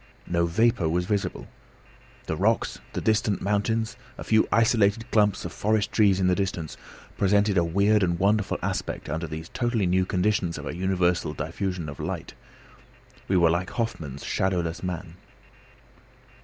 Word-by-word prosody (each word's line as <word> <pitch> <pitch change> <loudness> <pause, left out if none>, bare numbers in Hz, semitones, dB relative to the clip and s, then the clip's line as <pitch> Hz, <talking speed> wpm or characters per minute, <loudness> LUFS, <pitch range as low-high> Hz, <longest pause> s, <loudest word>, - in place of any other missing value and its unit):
No 85 -1 +1
vapour 95 -2 +2
was 90 +2 0
visible. 100 0 -2 0.8
The - - -2
rocks, - - +1
the - - -2
distant 105 -2 +1
mountains, 110 +3 0 0.2
a - - -6
few 110 0 +3
isolated 115 0 +2
clumps 105 -4 +2
of 90 - -5
forest 105 0 0
trees 100 -1 +4
in 95 - +2
the 90 - +4
distance, 90 -5 -2 0.4
presented 100 +1 +3
a 85 - +4
weird 100 +5 +3
and 85 -2 +1
wonderful 100 +2 +1
aspect - - -3
under 80 +2 -2
these 80 +1 -7
totally 120 -5 0
new 90 +1 +2
conditions 95 -3 0
of - - -7
a - - -4
universal 90 -3 0
diffusion 85 +2 -3
of 75 - -8
light. 80 +2 -4 0.9
We 95 - +2
were 85 -2 +5
like 85 +2 -1
Hoffmann's 80 - -4
shadowless 90 -3 -1
man. 85 -2 -5
95 Hz, 155 wpm, -26 LUFS, 85-105 Hz, 0.9 s, were